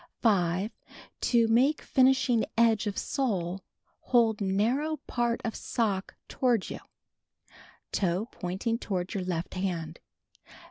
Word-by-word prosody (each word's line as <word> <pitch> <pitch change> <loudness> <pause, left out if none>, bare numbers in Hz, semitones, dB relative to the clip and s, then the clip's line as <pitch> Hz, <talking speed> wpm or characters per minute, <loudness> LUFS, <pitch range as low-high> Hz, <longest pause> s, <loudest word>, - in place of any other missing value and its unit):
5. 190 -1 +2 0.6
To 235 -2 +4
make 260 +7 +3
finishing 260 -3 +3
edge 225 -2 +3
of 200 - -3
sole 195 - -1 0.2
— - - -42
hold 225 -4 +2
narrow 235 +11 +1
part 240 -1 0
of 225 - -2
sock 205 -5 -2
toward 245 -7 0
you, - - -5 1.1
toe 185 +2 0
pointing 195 +6 -2
toward 185 -5 -3
your 195 -3 -2
left 175 -2 -3
hand. 170 -4 -3
220 Hz, 120 wpm, -29 LUFS, 185-240 Hz, 1.1 s, To